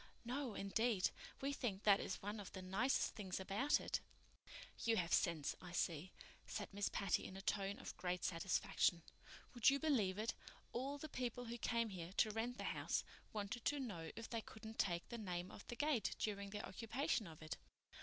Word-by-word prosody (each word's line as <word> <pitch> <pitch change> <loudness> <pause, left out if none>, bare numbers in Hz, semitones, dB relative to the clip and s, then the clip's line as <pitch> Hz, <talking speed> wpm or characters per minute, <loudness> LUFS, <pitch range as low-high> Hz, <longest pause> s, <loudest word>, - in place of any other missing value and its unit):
"No, 250 -2 -1
indeed. 205 0 +2 0.3
We 275 +1 +1
think 215 -8 -1
that 205 -1 +7
is 185 - -3
one 205 +2 -2
of 200 - -6
the 190 - -4
nicest 210 +9 +2
things 190 -4 -3
about 205 +10 +3
it." - - 0 0.8
"You 230 -1 +4
have 170 -3 +1
sense, 165 -4 +3
I 180 -1 -8
see," 170 0 0 0.4
said - - -3
Miss 205 0 +1
Patty 200 - +1
in 190 - -6
a - - -5
tone 200 -1 +1
of - - -6
great 180 -1 -1
satisfaction. 170 -1 +2 0.5
"Would 240 0 +7
you 275 - +4
believe 240 -11 +3
it? 220 +2 0 0.4
All 270 +4 -1
the 310 - -5
people 245 -3 -2
who 235 +1 -4
came 230 -1 +2
here 180 -2 -5
to 215 - +4
rent 230 +3 -1
the - - -3
house - - +1 0.3
wanted 215 +3 -2
to 290 - +3
know 185 -11 -3
if 230 - -5
they 230 -1 -1
couldn't 220 +1 -9
take 175 -2 +2
the 235 - -4
name 180 -3 -2
off - - -10
the 240 - -4
gate 290 -4 +2
during 200 -2 -1
their 205 +1 -3
occupation 230 - 0
of 160 -1 -10
it. 155 - -3
210 Hz, 195 wpm, -42 LUFS, 185-240 Hz, 0.8 s, that